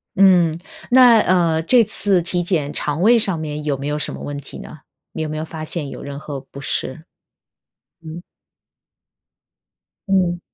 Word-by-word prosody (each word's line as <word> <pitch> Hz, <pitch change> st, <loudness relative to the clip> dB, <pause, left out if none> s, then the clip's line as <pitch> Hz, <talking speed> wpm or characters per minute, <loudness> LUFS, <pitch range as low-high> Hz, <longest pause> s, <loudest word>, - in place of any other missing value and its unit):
嗯， 180 Hz, -4 st, +4 dB, 0.3 s
那， 245 Hz, -2 st, +7 dB
呃， 170 Hz, -5 st, +2 dB
这 240 Hz, +7 st, +5 dB
次 200 Hz, -3 st, +2 dB
体 175 Hz, +1 st, -1 dB
检 155 Hz, -5 st, -1 dB
肠 150 Hz, +2 st, -3 dB
胃 230 Hz, +5 st, +5 dB
上 195 Hz, -6 st, 0 dB
面， 150 Hz, -1 st, -5 dB
有 145 Hz, -2 st, -1 dB
没 140 Hz, +2 st, -5 dB
有 150 Hz, 0 st, -2 dB
什 -, -, -2 dB
么 -, -, -8 dB
问 145 Hz, 0 st, -6 dB
题 140 Hz, -, -10 dB
呢？ 155 Hz, -, -11 dB, 0.3 s
你 160 Hz, -, -5 dB
有 155 Hz, -, -3 dB
没 155 Hz, -, -5 dB
有 155 Hz, -, -4 dB
发 160 Hz, -1 st, -8 dB
现 155 Hz, -2 st, -4 dB
有 -, -, -9 dB
任 140 Hz, 0 st, -7 dB
何 145 Hz, -2 st, -7 dB
不 140 Hz, +1 st, -13 dB
适？ 140 Hz, +3 st, -4 dB, 1.0 s
嗯。 165 Hz, +2 st, -8 dB, 1.9 s
嗯。 180 Hz, -3 st, +1 dB
160 Hz, 180 characters per minute, -19 LUFS, 150-185 Hz, 1.9 s, 那